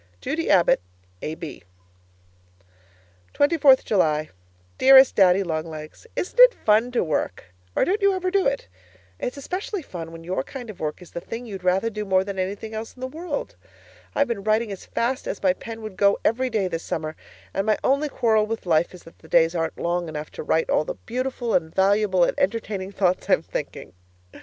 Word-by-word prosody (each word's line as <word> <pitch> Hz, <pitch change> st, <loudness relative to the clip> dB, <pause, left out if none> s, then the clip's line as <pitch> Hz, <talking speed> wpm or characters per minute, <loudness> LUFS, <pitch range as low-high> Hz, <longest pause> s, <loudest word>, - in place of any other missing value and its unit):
Judy 320 Hz, -, -2 dB
Abbott, 175 Hz, -, +4 dB, 0.4 s
A.B. 155 Hz, -1 st, -6 dB, 1.7 s
24th 285 Hz, -3 st, +5 dB
July 155 Hz, -6 st, +1 dB, 0.5 s
Dearest 265 Hz, 0 st, +8 dB
Daddy 190 Hz, 0 st, +5 dB
Long 160 Hz, -2 st, -3 dB
Legs, 155 Hz, -, -10 dB
Isn't 380 Hz, -, -4 dB
it -, -, +9 dB
fun 220 Hz, +3 st, +2 dB
to 245 Hz, -, +2 dB
work 120 Hz, -, -3 dB, 0.2 s
or -, -, +3 dB
don't 405 Hz, +4 st, 0 dB
you 400 Hz, -1 st, +4 dB
ever 370 Hz, 0 st, -1 dB
do 395 Hz, -4 st, +3 dB
it? 275 Hz, 0 st, -2 dB, 0.5 s
It's 250 Hz, -, -4 dB
especially 365 Hz, +5 st, -4 dB
fun 165 Hz, -8 st, -7 dB
when 165 Hz, 0 st, -10 dB
your 175 Hz, -4 st, -2 dB
kind 245 Hz, -, -8 dB
of 195 Hz, -, -16 dB
work 155 Hz, +3 st, -4 dB
is 175 Hz, -, -16 dB
the 170 Hz, -, -5 dB
thing 230 Hz, +6 st, -7 dB
you'd 195 Hz, -5 st, -7 dB
rather 190 Hz, +5 st, +2 dB
do 210 Hz, 0 st, -4 dB
more 190 Hz, -2 st, +2 dB
than 195 Hz, -1 st, -5 dB
anything 200 Hz, +4 st, -4 dB
else 220 Hz, +1 st, -6 dB
in -, -, -18 dB
the -, -, -2 dB
world. 310 Hz, +2 st, -5 dB, 0.6 s
I've 285 Hz, -, +3 dB
been 225 Hz, -4 st, -3 dB
writing 215 Hz, +1 st, +1 dB
as 195 Hz, -, -8 dB
fast 255 Hz, +3 st, -1 dB
as 205 Hz, -, -5 dB
my 185 Hz, -2 st, +4 dB
pen 225 Hz, +3 st, -9 dB
would 215 Hz, -3 st, -8 dB
go 200 Hz, 0 st, +4 dB
every 255 Hz, +4 st, +2 dB
day 215 Hz, -5 st, 0 dB
this 165 Hz, -2 st, -3 dB
summer, 155 Hz, -1 st, -4 dB, 0.4 s
and 195 Hz, +2 st, -1 dB
my 215 Hz, -, +3 dB
only 280 Hz, +3 st, +2 dB
quarrel 220 Hz, -5 st, +2 dB
with 225 Hz, -1 st, -4 dB
life 170 Hz, +1 st, +2 dB
is 180 Hz, -, -14 dB
that 165 Hz, -, -16 dB
the 160 Hz, -, -16 dB
days 165 Hz, +1 st, +4 dB
aren't 165 Hz, -2 st, -2 dB
long 175 Hz, 0 st, -1 dB
enough 150 Hz, -1 st, -6 dB
to -, -, -7 dB
write 160 Hz, +1 st, 0 dB
all -, -, +3 dB
the -, -, -5 dB
beautiful 250 Hz, -1 st, -2 dB
and 160 Hz, 0 st, 0 dB
valuable 195 Hz, -1 st, +3 dB
and -, -, +2 dB
entertaining 200 Hz, -2 st, -1 dB
thoughts 185 Hz, -2 st, 0 dB
I'm -, -, +4 dB
thinking. -, -, -6 dB
200 Hz, 195 wpm, -24 LUFS, 170-250 Hz, 1.7 s, it